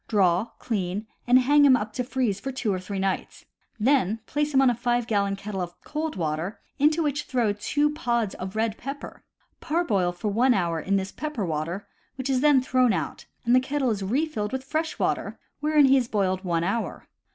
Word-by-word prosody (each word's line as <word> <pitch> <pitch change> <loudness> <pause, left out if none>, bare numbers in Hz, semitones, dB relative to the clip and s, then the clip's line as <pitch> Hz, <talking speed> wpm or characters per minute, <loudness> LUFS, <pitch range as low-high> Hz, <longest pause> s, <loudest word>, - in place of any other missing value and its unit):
Draw, 190 -2 +3
clean, 200 -2 -2 0.2
and 250 +1 +7
hang 290 +3 +5
him 275 -2 +7
up 215 -1 -5
to 250 - -1
freeze 245 -6 -1
for 270 +6 -4
two 240 -6 -1
or 185 - -2
three 195 +2 -5
nights. 190 0 -2 0.3
Then 225 -3 +2
place 295 +3 -1
him 270 -1 +4
in 260 -2 +5
a - - 0
5 240 0 0
gallon 200 -3 +1
kettle 195 -1 -5
of 175 -1 -6
cold 310 +1 -3
water, 165 +3 -3 0.2
into 310 +3 +3
which 295 0 -1
throw 235 -5 +1
two 290 +8 0
pods 235 -9 -1
of 185 +2 -7
red 220 -1 -1
pepper. 275 +2 -7 0.4
Parboil 215 - +1
for 175 +4 -3
one 240 +5 +3
hour 170 -3 0
in 195 +4 0
this 190 0 -1
pepper 300 -9 -3
water, 165 +4 -3 0.3
which 265 0 -2
is 255 -1 +2
then 290 -3 +5
thrown 255 -3 +3
out 160 -5 -4 0.2
and 240 +1 +4
the - - +7
kettle 265 -1 0
is 205 -2 -2
refilled 220 0 -1
with 265 0 -3
fresh 310 +3 -2
water, - - -1 0.2
wherein 300 -1 +4
he 270 0 +6
is 250 -3 0
boiled 190 -4 0
one 170 -2 0
hour. 200 +6 -2
230 Hz, 205 wpm, -26 LUFS, 195-270 Hz, 0.4 s, and